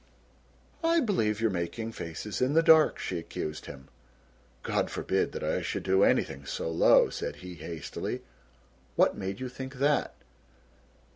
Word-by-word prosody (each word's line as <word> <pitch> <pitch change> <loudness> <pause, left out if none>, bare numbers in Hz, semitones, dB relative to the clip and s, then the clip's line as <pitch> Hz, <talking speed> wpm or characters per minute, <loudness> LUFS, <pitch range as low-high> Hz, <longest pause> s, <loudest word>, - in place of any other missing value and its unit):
"I 335 +1 +4
believe 145 - +1
you're 115 -1 +2
making 95 +6 -3
faces 100 +3 -5
in 130 +3 +2
the 165 +1 +5
dark," 160 -2 +6
she 90 - -3
accused 75 -2 -6
him. 65 -1 -10 0.8
"God - - 0
forbid - - -1
that - - -5
I - - 0
should - - -3
do 95 +1 +3
anything 70 0 +2
so 80 - -3
low," 80 - +5
said - - -4
he 90 - -7
hastily; 80 -1 -5 0.7
"what - - +4
made 95 +1 -4
you 130 - -3
think 130 +2 -7
that?" 145 +3 +1
105 Hz, 150 wpm, -29 LUFS, 85-135 Hz, 0.8 s, dark